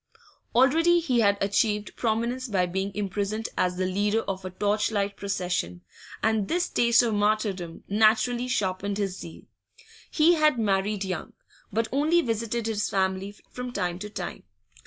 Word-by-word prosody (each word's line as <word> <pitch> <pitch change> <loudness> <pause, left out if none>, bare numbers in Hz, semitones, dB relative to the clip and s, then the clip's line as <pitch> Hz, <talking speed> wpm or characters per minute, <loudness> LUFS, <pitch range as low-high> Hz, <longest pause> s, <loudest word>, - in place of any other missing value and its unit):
Already 325 +8 +5
he 265 -8 +1
had 200 -2 +4
achieved 205 +1 0
prominence 235 +3 -1
by 190 -5 +1
being 190 +3 -2
imprisoned 205 +2 -2
as 180 0 +1
the 185 - 0
leader 205 +4 +1
of 195 -2 -5
a 185 - -4
torch 205 +3 0
light 200 -2 -1
procession, 180 - -2 0.4
and 220 -3 +1
this 350 +1 0
taste 235 0 +4
of 230 -2 0
martyrdom 205 -5 -1
naturally 220 +4 +3
sharpened 200 -3 -1
his 195 -3 -2
zeal. 165 - -10 0.7
He 325 +2 +4
had 305 -5 +3
married 200 -1 0
young, 185 -3 -4 0.4
but 225 +2 0
only 310 +6 +3
visited 230 -1 -2
his 215 -2 -1
family 190 +1 -1 0.2
from 250 0 -5
time 175 -6 -2
to 210 +2 -6
time. - - -6
210 Hz, 155 wpm, -26 LUFS, 195-235 Hz, 0.7 s, Already